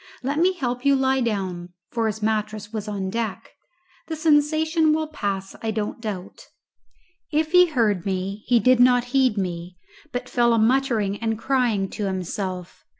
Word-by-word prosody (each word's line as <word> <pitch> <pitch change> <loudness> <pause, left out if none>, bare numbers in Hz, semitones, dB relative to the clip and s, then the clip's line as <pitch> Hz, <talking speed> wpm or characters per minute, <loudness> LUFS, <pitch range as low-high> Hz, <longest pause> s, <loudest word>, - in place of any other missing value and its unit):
Let 280 +4 -1
me 365 +3 +4
help 250 -7 -3
you 280 -1 +4
to 265 - 0
lie 265 0 +2
down" 185 -6 -3 0.2
(for 230 -1 0
his 220 0 -4
mattress 215 -1 -2
was 215 -1 -4
on 195 -2 -3
deck); 225 -2 -4 0.6
"the 320 - -3
sensation 315 +1 +3
will 315 0 0
pass, 200 -10 -4
I 225 - -2
don't 215 +1 -3
doubt." 200 -4 -6 0.8
If 310 +1 0
he 360 0 +7
heard 225 - +1
he 195 +5 0
did 255 +3 +4
not 245 0 +5
heed 260 -5 +3
me, 180 -1 -4 0.3
but 245 0 -4
fell 240 -2 +2
a - - +3
muttering 225 -4 +1
and 225 -1 -1
crying 235 -5 +1
to 210 - -3
himself. 185 -1 -4
225 Hz, 165 wpm, -23 LUFS, 200-265 Hz, 0.8 s, he